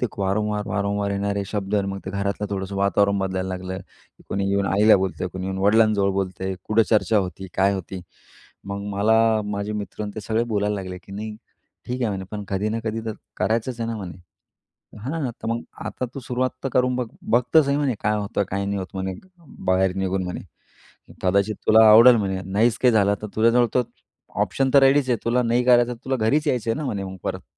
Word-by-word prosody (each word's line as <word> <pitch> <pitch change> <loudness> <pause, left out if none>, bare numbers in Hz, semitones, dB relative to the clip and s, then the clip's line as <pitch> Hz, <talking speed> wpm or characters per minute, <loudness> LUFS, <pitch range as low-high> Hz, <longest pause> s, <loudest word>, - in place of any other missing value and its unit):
ते 125 - +1
वारंवार, 105 +1 -1
वारंवार 100 0 -1
येणारे 100 0 -1
शब्द 100 0 -3
आणि 100 -1 +1
मग 100 0 -4
ते 95 - -5
घरातलं 100 +1 -2
थोडंसं 95 0 -4
वातावरण 100 +1 +2
बदलायला 95 -1 -2
लागलं 95 0 -5
की - - -20
कोणी 100 0 -1
येऊन 100 0 +1
आईला 105 +3 +5
बोलतंय, 95 -1 -2
कोणी 95 +1 -6
येऊन 95 0 -3
वडिलांजवळ 105 0 +3
बोलतंय, 95 0 -3
कुठं 110 +1 +3
चर्चा 110 0 +3
होती? 95 0 -4
काय 95 +1 +3
होती? 95 0 -6 0.6
मग 100 0 -5
मला 105 +3 +3 0.3
माझे 105 0 -3
मित्र 105 0 -5
आणि 105 - -4
ते 110 - -5
सगळे 110 +2 0
बोलायला 105 0 0
लागले 95 -2 -5
की, 100 - -15
"नाही, 105 +1 -6 0.5
ठीक 125 +1 -3
आहे 120 - +1
म्हणे. 95 -1 -4
पण 105 -1 -5
कधी 100 +2 -1
ना 110 - -2
कधी 110 0 -2
तर 110 - -2 0.2
करायचंच 115 +2 -1
आहे 115 - -2
ना 115 - -3
म्हणे 95 -5 -7 0.8
हां, 135 +2 -3
तर - - -10
मग 115 +1 -1 0.2
आता 125 - -4
तू 135 - -5
सुरुवात 130 +1 -1
तर 135 - +1
करून 125 -1 +2
बघ. 125 -2 -1 0.2
बघतर 125 +7 +3
सही 140 - -4
आहे 140 - +2
म्हणे, 140 -4 +1
काय 105 +1 +1
होतं? 100 0 -1
काय 100 +1 -1
नाही 100 0 -2
होतं? 95 -1 -6
म्हणे 95 0 -3 0.5
बाहेर 95 0 +2
निघून 95 0 -1
म्हणे 90 - -5 0.8
कदाचित 100 +3 +1
तुला 110 +1 +7
आवडेल 120 +3 +9
म्हणे. 95 -3 -1
नाहीच 115 +3 +2
काही 125 -2 +4
झालं 100 -2 +3
तर - - -3
तुझ्याजवळ 115 +2 +4
तो 125 - +4 0.6
ऑप्शन 135 -1 0
तर 140 - +8
रेडीच 135 0 +4
आहे. 120 - +2
तुला 125 +2 +2
नाही 120 +1 +1
करायचं? 120 -1 +4
तुला 130 0 0
घरीच 130 +7 +1
यायचं 120 -4 0
आहे 115 - 0
ना 155 - -3
म्हणे 100 -5 -3
मग 95 0 -7
परत." - - -4
105 Hz, 210 wpm, -23 LUFS, 95-115 Hz, 0.8 s, आवडेल